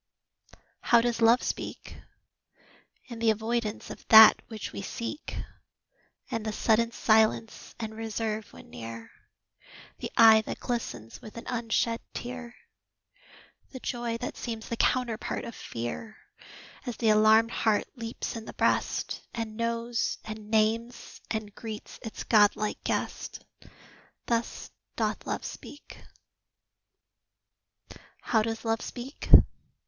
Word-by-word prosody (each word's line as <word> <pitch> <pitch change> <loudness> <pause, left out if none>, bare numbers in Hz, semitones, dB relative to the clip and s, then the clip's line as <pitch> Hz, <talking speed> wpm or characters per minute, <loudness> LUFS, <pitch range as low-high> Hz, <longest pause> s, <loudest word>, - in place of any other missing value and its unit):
How 235 - +5
does 235 0 0
Love 230 +2 +5
speak? - - -5 1.1
In 235 -3 -8
the 230 -1 +3
avoidance 220 0 -1
of - - -10
that 220 -1 +10
which 220 -2 -7
we - - -5
seek 230 +8 -5 0.9
The 225 -2 -2
sudden 230 +2 +2
silence 220 0 +1
and 220 -1 -4
reserve 220 -1 -3
when - - -14
near 115 -1 -8 0.9
The - - -4
eye 220 -1 +8
that - - -4
glistens 230 - -4
with 215 - -11
an 230 - -8
unshed 230 -1 0
tear 245 -1 -6 1.2
The 260 - -7
joy 240 -2 -3
that 245 - -5
seems 225 -2 -5
the 235 - -1
counterpart 235 -1 0
of 235 - -7
fear, 120 - -6 0.7
As 240 - -4
the 225 - +2
alarmed 215 +2 +5
heart 220 -3 +1
leaps 230 -1 -5
in 225 -1 -6
the - - -8
breast, - - 0
And 225 -2 -4
knows 230 +1 -1
and 215 -1 -8
names 225 +2 0
and 215 -2 -3
greets 220 -2 -8
its 225 -3 -6
godlike 210 -1 +3
guest - - -3 0.8
Thus 235 0 -2 0.2
doth - - -2
Love - - -3
speak. 290 - -10 2.2
How 220 -2 +2
does 225 +1 -3
Love 225 0 0
speak? 255 +3 -7
225 Hz, 120 wpm, -28 LUFS, 215-235 Hz, 2.2 s, that